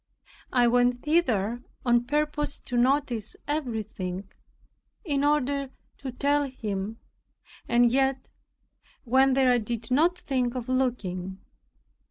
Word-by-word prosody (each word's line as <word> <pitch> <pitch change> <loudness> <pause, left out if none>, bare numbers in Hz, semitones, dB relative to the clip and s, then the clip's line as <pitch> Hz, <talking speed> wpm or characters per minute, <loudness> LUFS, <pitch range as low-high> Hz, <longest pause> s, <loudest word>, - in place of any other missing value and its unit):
I 245 -1 +4
went 245 +1 +2
thither 240 - +1 0.2
on 240 -1 +3
purpose 295 +1 0
to 245 - -5
notice 245 -3 +1
everything, 215 -10 -3 0.8
in 285 -4 0
order 285 -2 +1 0.3
to 270 -2 -5
tell 285 +3 +1
him 215 -3 -4 0.7
and 240 0 +4
yet 265 0 0 0.7
when 265 +2 +4
there 255 -2 +4
did 230 +1 -5
not 330 +7 +3
think 255 -6 -1
of 250 -1 -4
looking. 200 -8 -1
250 Hz, 110 wpm, -27 LUFS, 230-280 Hz, 0.8 s, I